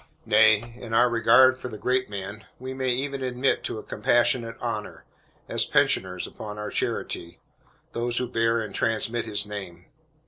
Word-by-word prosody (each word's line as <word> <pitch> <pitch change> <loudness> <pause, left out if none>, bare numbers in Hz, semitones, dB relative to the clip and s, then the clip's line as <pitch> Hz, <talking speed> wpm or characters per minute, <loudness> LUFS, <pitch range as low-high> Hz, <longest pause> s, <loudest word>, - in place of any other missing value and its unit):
Nay, 110 +1 +4
in 115 -2 -4
our 120 +2 +5
regard 130 +3 +5
for - - -6
the 110 -3 -8
great 130 +2 0
man, 100 +1 -7
we 130 +1 -6
may 130 -1 -2
even 135 +2 -2
admit 125 +1 0
to - - -3
a 110 - -7
compassionate 115 +1 +1
honor, 110 -3 -5 0.4
as - - +2
pensioners 90 -1 +1
upon 105 -1 -8
our 105 0 -5
charity, 85 0 -3 0.6
those 120 0 -2
who 125 - 0
bear 115 0 +1
and 105 -3 -6
transmit 115 +1 0
his 105 -1 +2
name. 95 -4 -8
115 Hz, 165 wpm, -25 LUFS, 105-125 Hz, 0.6 s, our